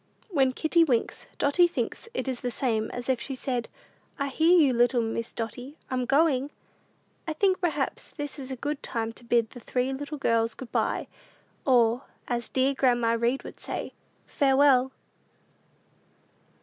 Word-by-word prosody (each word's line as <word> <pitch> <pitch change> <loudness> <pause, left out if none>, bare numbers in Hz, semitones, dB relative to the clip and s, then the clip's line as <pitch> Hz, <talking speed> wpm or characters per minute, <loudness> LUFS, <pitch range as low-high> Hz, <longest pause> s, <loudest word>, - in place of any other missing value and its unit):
When 270 -6 +3
kitty 330 +4 +3
winks, 250 -8 0
Dotty 345 +5 +4
thinks 400 +6 -4
it - - -1
the 250 -2 -2
same 225 -3 -1
as 245 0 -6
if 260 -2 +1
she 270 - -4
said, 250 -2 -3 0.5
"I 280 -1 -1
hear 325 +6 +4
you, 285 -6 +5
little 240 0 +3
Miss 225 +1 -3
Dotty: 245 +6 -6
I'm 255 -1 0
going." 280 -1 +3 0.8
I 320 - -1
think 375 +3 +2
perhaps 300 -6 -1
this 290 -1 -5
is 265 -1 -6
a 260 - -3
good 285 +3 -3
time 225 -1 -3
to 240 - -11
bid 235 -1 +1
the 245 - -10
three 250 +2 -1
little 290 +3 -5
girls 230 -4 +1
good 260 -4 -9
by, - - 0 0.6
or, 240 -1 +4 0.2
as 240 -2 -2
dear 265 +1 +2
grandma 240 -4 +2
Read 235 +3 0
would - - -10
say, - - -5 0.3
"Farewell!" 270 -2 +4
260 Hz, 160 wpm, -27 LUFS, 240-285 Hz, 0.8 s, you